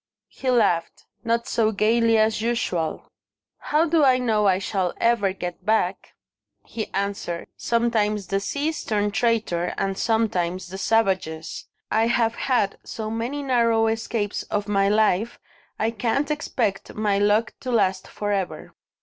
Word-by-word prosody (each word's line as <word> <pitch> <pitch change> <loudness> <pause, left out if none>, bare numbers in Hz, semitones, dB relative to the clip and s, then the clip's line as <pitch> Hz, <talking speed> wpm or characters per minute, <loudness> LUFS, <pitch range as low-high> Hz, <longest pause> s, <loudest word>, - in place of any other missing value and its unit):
He 265 - -4
laughed 175 -9 +1 0.2
not 230 +1 0
so 220 -1 +2
gaily 225 +2 +3
as 215 0 +2
usual. 205 -9 -2 0.5
"How 310 +2 +1
do 325 -2 +3
I 260 -2 +5
know 220 -4 +1
I 185 -1 +4
shall 190 -2 -2
ever 230 -5 +2
get 180 -2 -6
back?" 210 -4 0 0.5
he 220 - -5
answered. 195 -3 -3
"Sometimes 220 -3 0
the 195 +2 -1
seas 290 +9 -2
turn 210 -1 0
traitor, 210 -6 0
and 195 0 -1
sometimes 185 -6 0
the 190 +1 -7
savages. 190 -8 0 0.2
I 225 +1 +3
have 235 -1 +2
had 235 -6 0
so 220 -1 -5
many 240 +6 -3
narrow 230 -4 +3
escapes 225 -2 -1
of 205 0 -1
my 200 -1 +2
life, 215 +1 +2 0.4
I 220 +1 0
can't 245 +6 -1
expect 245 -9 -2
my 210 -2 +1
luck 210 +3 +2
to 255 - -4
last 190 -5 +1
for 205 0 -4
ever." 195 -3 -3
215 Hz, 145 wpm, -24 LUFS, 195-235 Hz, 0.5 s, I